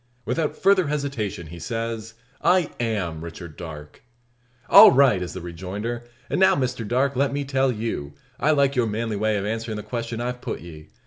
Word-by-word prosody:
Without 160 -2 -1
further 195 -4 +4
hesitation, 140 - -3
he 85 +2 -10
says 115 +4 -4 0.3
"I 180 -3 +3
am 95 -9 -2
Richard 85 -1 -9
Darke." 75 -3 -9 0.7
"All - - +10
right!" 130 -8 +4
is 90 - -5
the 95 - -6
rejoinder. 95 +8 -5 0.2
"And - - -1
now, 190 - +6
Mr 125 -4 -2
Darke, 130 +4 +1
let 140 +2 +1
me 140 0 -2
tell 135 -1 +1
you, 110 - -4 0.3
I 150 - +2
like 140 -2 +3
your 120 -3 +2
manly 110 +1 -2
way 110 +1 +1
of 100 - -3
answerin' 110 0 -3
the 105 - -6
question 115 -1 -4
I've 125 +1 -3
put - - -5
ye. 80 -3 -11
115 Hz, 185 wpm, -24 LUFS, 95-135 Hz, 0.7 s, All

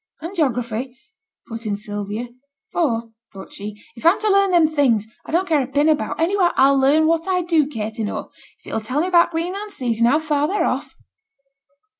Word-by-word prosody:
'And 335 +5 -7
geography,' 250 - -1 0.5
put 225 -1 -7
in 205 - 0
Sylvia; 205 +2 -5 0.4
'for,' 230 -9 -1 0.2
thought 190 -1 -11
she, 210 +1 -8 0.2
'if 230 - -12
I'm 335 +4 +4
to 430 -1 +2
learn 395 0 +4
them 345 -3 +4
things 270 -9 +2 0.2
I - - -6
don't 360 +4 +1
care 310 -4 +2
a 255 - -3
pin 285 +3 +1
about, 310 -1 0
anyhow 355 +2 +2
I'll 275 +1 +5
learn 290 +4 +4
what 330 +2 +1
I 365 -1 +1
do 325 -4 +2
care 220 -7 -4
to 220 0 -5
know, 205 - -5 0.3
if - - -33
it - - -5
'll 220 - -1
tell 255 +7 -1
me - - 0
about 345 -2 +5
t' - - -15
Greenland 370 +6 -3
seas, 240 - -2
and 235 0 +4
how 285 - +4
far 300 -2 0
they're 405 +5 0
off.' - - -3
290 Hz, 215 wpm, -21 LUFS, 230-335 Hz, 0.5 s, I'll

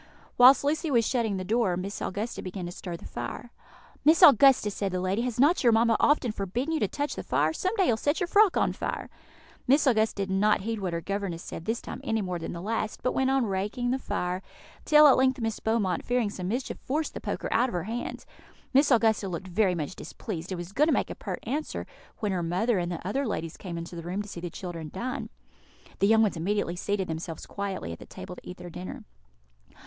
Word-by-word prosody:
Whilst 255 +3 +7
Lucy 305 +3 0
was 235 -5 +3
shutting 225 -5 0
the 185 - -3
door, 205 -2 +1
Miss 195 +3 -5
Augusta 210 +5 -3
began 185 -1 -5
to 175 - -5
stir 175 -1 -6
the - - -13
fire. 120 - -6 0.5
"Miss 315 +2 +5
Augusta," 265 -5 +7
said 195 -1 -2
the 185 - -1
lady, 185 +4 0
"has 245 -1 -3
not 295 +6 +4
your 240 - +6
mamma 225 0 +4
often 290 -5 +3
forbidden 225 - -2
you 315 - +1
to - - +1
touch 290 0 -3
the - - -5
fire? 150 +5 +1
Some 370 - -1
day 390 - +3
you - - +3
will 220 - +1
set 290 - 0
your 360 - +1
frock 405 +2 +4
on - - +2
fire." - - -4 0.6
Miss 280 +5 +4
Augusta 220 -4 +3
did 190 - -7
not 205 +2 +3
heed 225 +2 -3
what 185 -3 -3
her 170 - -2
governess 195 -3 -3
said 165 - -7
this 225 +1 -2
time - - -7
any 225 - 0
more 180 -2 -3
than 165 - -5
the 170 0 -6
last, 220 0 -3
but 255 - +2
went 265 0 +1
on 270 -2 +2
raking 210 +5 -1
the 265 - 0
fire; 180 -6 -2 0.4
till 300 0 +7
at 275 - +6
length 260 0 +3
Miss 225 -2 -2
Beaumont, 220 -4 0
fearing 245 -4 0
some 180 -2 -5
mischief, 245 +6 -3
forced 305 +4 -2
the - - -6
poker - - -3
out 245 +3 +3
of - - -8
her 175 -2 -1
hand. 230 +4 -5 0.5
Miss 280 +2 +5
Augusta 220 -5 +3
looked 180 +2 -5
very 185 0 +2
much 160 +2 -4
displeased, 180 -4 -6
and 185 - -2
was 175 +1 -7
going 295 +9 +3
to - - +3
make - - 0
a - - -5
pert - - -6
answer, 290 +7 -3 0.3
when 210 -2 -1
her 180 -2 -1
mother 185 +6 +1
and 175 0 -2
the 175 +1 -5
other 270 +6 -1
ladies 165 -6 -3
came 175 -3 -7
into 170 +1 -7
the 170 - -5
room 180 +5 -3
to - - -11
see 185 - -7
the 175 0 -5
children 170 -3 -6
dine. 250 +6 -4 0.7
The 200 - +4
young 220 +1 +5
ones 205 -5 0
immediately 180 +1 -1
seated 195 +1 -1
themselves 160 0 -5
quietly 195 - -4
at 85 - -8
the - - -12
table 185 -1 -9
to - - -12
eat 180 - -8
their 175 - -9
dinner. 180 +2 -7
205 Hz, 240 wpm, -28 LUFS, 180-245 Hz, 0.7 s, Whilst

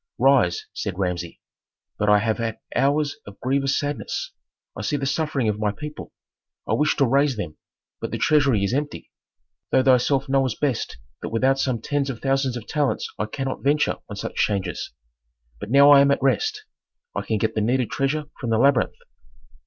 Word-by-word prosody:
"Rise," 435 - +3
said 95 -3 -4
Rameses. 90 -3 -2 0.6
"But 105 - +2
I 105 - +7
have 110 +2 0
had 115 -1 -2 0.2
hours 145 +1 +1
of 100 - -11
grievous 135 +2 +1
sadness: 145 0 -3 0.4
I - - -5
see 145 +7 -1
the 135 - -3
suffering 145 -3 0
of 105 -1 -1
my 105 -1 +1
people; 150 +7 -8 0.6
I - - 0
wish 150 +1 +2
to 140 - +3
raise 135 0 +2
them, 85 -7 -5 0.4
but - - -4
the - - -3
treasury 140 -9 +3
is 100 - 0
empty. 145 +2 -3 0.6
Thou 130 - +3
thyself 135 +2 +3
knowest 135 -3 +1
best 140 -6 -1 0.2
that - - -4
without 130 +4 +2
some 125 -5 0
tens 145 -1 -1
of 125 -4 -5
thousands 135 -2 0
of 115 - -8
talents 150 -3 -1
I 105 - -1
cannot 135 +4 -4
venture 145 +2 +2
on 105 - -6
such 95 - -5
changes. 95 -5 -1 0.7
But 105 - -7
now 140 +3 +7
I 140 -1 +9
am 140 - +4
at 140 - +2
rest; 430 - +1 0.5
I - - -1
can 110 - -1
get 110 +2 0
the 110 - 0
needed 125 +2 +1
treasure 145 +2 -1
from 120 - -3
the 115 - +2
labyrinth." 135 +1 +3
135 Hz, 185 wpm, -23 LUFS, 110-140 Hz, 0.7 s, I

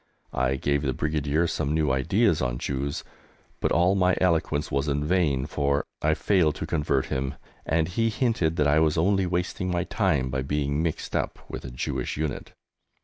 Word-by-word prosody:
I 65 +1 +1
gave 70 +1 0
the 70 -3 -1
Brigadier 75 +1 0
some 80 -2 -1
new 75 -3 +2
ideas 85 - +2
on - - -1
Jews, 70 +2 -3 0.6
but - - 0
all 90 +3 +4
my 90 -2 +2
eloquence 80 -4 +1
was 70 +2 0
in 70 +1 0
vain, 75 -6 +1
for 70 -1 0 0.2
I 80 0 +2
failed 85 -7 +2
to - - -4
convert 75 -4 0
him, 65 +1 -2 0.3
and 80 +1 +2
he 115 +6 0
hinted 110 -9 0
that 75 -2 +2
I 75 +2 +4
was 80 0 +2
only 95 +3 +2
wasting 90 +1 -2
my 90 -1 0
time 65 -6 0
by 65 0 -1
being 70 +2 -1
mixed 80 -2 -3
up - - -1
with - - -7
a - - -5
Jewish - - -3
unit! 75 -3 -3
75 Hz, 185 wpm, -26 LUFS, 70-85 Hz, 0.6 s, all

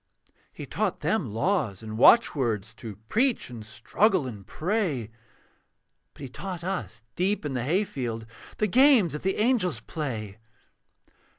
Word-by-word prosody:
He - - -8
taught - - -2
them - - 0
laws 115 - -1
and 110 0 -6
watchwords, 115 - +4
To 110 -2 -9
preach 235 - +1
and 115 -3 -8
struggle 145 - +1
and 105 -6 -8
pray; 160 - -2 1.0
But - - -15
he - - -4
taught 180 +6 -6
us 120 - -4
deep 190 0 0
in 145 - -2
the 125 - -1
hayfield 130 - -2 0.3
The 215 - +2
games 240 - +5
that 150 - -4
the 190 +1 0
angels 210 - +1
play. 110 -6 -5
145 Hz, 135 wpm, -26 LUFS, -, 1.0 s, games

